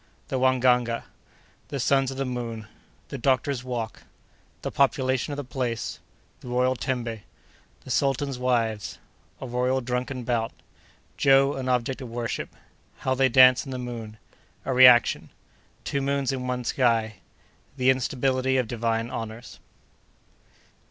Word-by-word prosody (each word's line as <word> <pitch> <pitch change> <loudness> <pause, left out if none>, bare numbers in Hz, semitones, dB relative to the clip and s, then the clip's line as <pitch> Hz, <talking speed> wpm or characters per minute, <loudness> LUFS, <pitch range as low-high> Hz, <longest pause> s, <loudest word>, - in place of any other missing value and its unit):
—The 130 - -1
Wangaga.—The 125 +1 -1
Sons 135 +1 +2
of 135 - -6
the 135 - -1
Moon.—The 120 +1 -7
Doctor's 130 0 +1
Walk.—The 120 -3 -8
Population 130 -1 +1
of 145 - -4
the 145 - -3
Place.—The 125 -1 -6
Royal 125 +1 +1
Tembe.—The 115 - -7
Sultan's 135 -1 0
Wives.—A 115 -1 -3
Royal 125 +2 0
Drunken 125 +1 -3
Bout.—Joe 135 +3 0
an 130 -1 -3
Object 125 +2 0
of 125 - -7
Worship.—How 120 +2 -5
they 130 0 +3
Dance 130 0 +7
in 135 - -10
the 130 - -4
Moon.—A 115 +1 -8
Reaction.—Two 125 +2 +3
Moons 140 -1 0
in 130 -1 -4
one 125 0 -2
Sky.—The 120 +2 -2
Instability 130 0 0
of 125 -3 +1
Divine 115 0 -1
Honors. 115 +1 -7
125 Hz, 105 wpm, -26 LUFS, 120-130 Hz, -, Dance